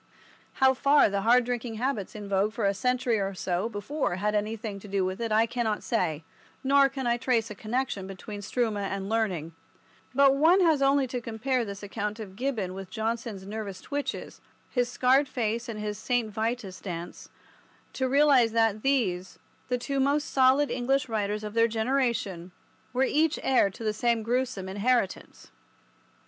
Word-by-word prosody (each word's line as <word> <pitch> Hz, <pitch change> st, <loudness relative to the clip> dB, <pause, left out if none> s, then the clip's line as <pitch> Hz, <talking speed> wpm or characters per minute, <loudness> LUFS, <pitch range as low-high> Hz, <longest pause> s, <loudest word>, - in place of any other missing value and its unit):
How 265 Hz, 0 st, +4 dB
far 280 Hz, +1 st, +4 dB
the 200 Hz, 0 st, 0 dB
hard 240 Hz, +3 st, +4 dB
drinking 240 Hz, -2 st, -3 dB
habits 230 Hz, -4 st, -2 dB
in 210 Hz, -1 st, -7 dB
vogue 200 Hz, +2 st, +1 dB
for 225 Hz, -3 st, -1 dB
a 200 Hz, -, +3 dB
century 245 Hz, +2 st, 0 dB
or 195 Hz, 0 st, -2 dB
so 185 Hz, +4 st, -1 dB
before 210 Hz, -, -2 dB
had 210 Hz, +3 st, -1 dB
anything 210 Hz, -1 st, -2 dB
to 205 Hz, -, -12 dB
do 195 Hz, -1 st, 0 dB
with 185 Hz, +4 st, -3 dB
it 230 Hz, -1 st, -2 dB
I 220 Hz, +1 st, +4 dB
cannot 230 Hz, -2 st, -2 dB
say, 165 Hz, -9 st, -1 dB, 0.4 s
nor 275 Hz, 0 st, +5 dB
can 270 Hz, -1 st, -5 dB
I 240 Hz, 0 st, +2 dB
trace 235 Hz, -3 st, 0 dB
a -, -, -3 dB
connection 215 Hz, -2 st, -3 dB
between 205 Hz, +2 st, -8 dB
struma 220 Hz, 0 st, -1 dB
and 195 Hz, 0 st, -3 dB
learning; 190 Hz, -8 st, -1 dB, 0.6 s
but 275 Hz, 0 st, +6 dB
one 325 Hz, +7 st, +5 dB
has 320 Hz, -5 st, +3 dB
only 275 Hz, 0 st, +4 dB
to 250 Hz, -1 st, -4 dB
compare 240 Hz, +3 st, -1 dB
this 200 Hz, -1 st, -7 dB
account 210 Hz, +1 st, -4 dB
of 195 Hz, -3 st, -8 dB
Gibbon 220 Hz, -6 st, -2 dB
with 190 Hz, -1 st, -8 dB
Johnson's 220 Hz, -1 st, -3 dB
nervous 200 Hz, -2 st, -5 dB
twitches, 285 Hz, +5 st, -5 dB, 0.3 s
his 245 Hz, -2 st, +1 dB
scarred 260 Hz, +3 st, +3 dB
face 235 Hz, -1 st, -2 dB
and 215 Hz, -2 st, -5 dB
his 210 Hz, 0 st, -4 dB
St. 240 Hz, -2 st, 0 dB
Vitus' 220 Hz, -3 st, -3 dB
dance, 175 Hz, -3 st, -7 dB, 0.6 s
to 260 Hz, -1 st, -1 dB
realize 270 Hz, -5 st, +4 dB
that 225 Hz, -2 st, +2 dB
these, 200 Hz, -10 st, 0 dB, 0.3 s
the 250 Hz, -, +1 dB
two 275 Hz, +3 st, -2 dB
most 285 Hz, +2 st, +1 dB
solid 270 Hz, +2 st, +4 dB
English 265 Hz, +2 st, 0 dB
writers 210 Hz, -1 st, -1 dB
of 210 Hz, -1 st, -5 dB
their 230 Hz, 0 st, +4 dB
generation, 225 Hz, -6 st, -1 dB, 0.4 s
were 255 Hz, +1 st, +1 dB
each 305 Hz, +3 st, +2 dB
heir 255 Hz, -6 st, +4 dB
to 195 Hz, -, -10 dB
the 215 Hz, -1 st, 0 dB
same 235 Hz, 0 st, +1 dB
gruesome 235 Hz, -5 st, -1 dB
inheritance. 205 Hz, +1 st, -1 dB
225 Hz, 175 wpm, -27 LUFS, 205-255 Hz, 0.6 s, but